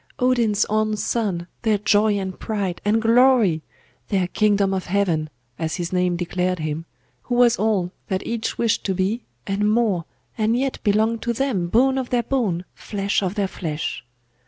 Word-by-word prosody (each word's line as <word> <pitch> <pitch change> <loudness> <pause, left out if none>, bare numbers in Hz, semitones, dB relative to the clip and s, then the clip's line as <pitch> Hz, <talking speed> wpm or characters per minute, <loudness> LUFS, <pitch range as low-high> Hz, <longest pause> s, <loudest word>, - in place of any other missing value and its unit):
Odin's 240 -6 +2
own 215 0 0
son, 200 -6 -1 0.2
their 220 -3 +2
joy 210 0 +3
and 190 -2 -4
pride, 200 -5 -3
and 210 +2 +2
glory! 230 -7 +4 0.5
Their 190 -4 +1
'Kingdom 200 -2 +2
of 190 -2 -3
heaven,' 175 -5 +1 0.3
as 160 -1 -2
his 175 0 -4
name 180 -1 +2
declared 180 +1 -1
him, 155 0 -3 0.4
who 245 - -3
was 240 -1 +5
all 205 -5 +1 0.2
that 190 -2 -2
each 230 -1 -3
wished 230 -2 +1
to 190 - 0
be, 195 +6 -1 0.2
and 205 +2 +1
more, 215 -7 +1 0.3
and 220 +2 +2
yet 265 +1 -1
belonged 220 +2 +2
to 235 - -1
them, 230 -8 0
bone 260 +7 +3
of 255 - -4
their 245 -1 +1
bone, 205 -11 -1
flesh 200 -1 -2
of 190 0 -2
their 200 -2 0
flesh! 155 - -4
205 Hz, 170 wpm, -22 LUFS, 185-230 Hz, 0.5 s, was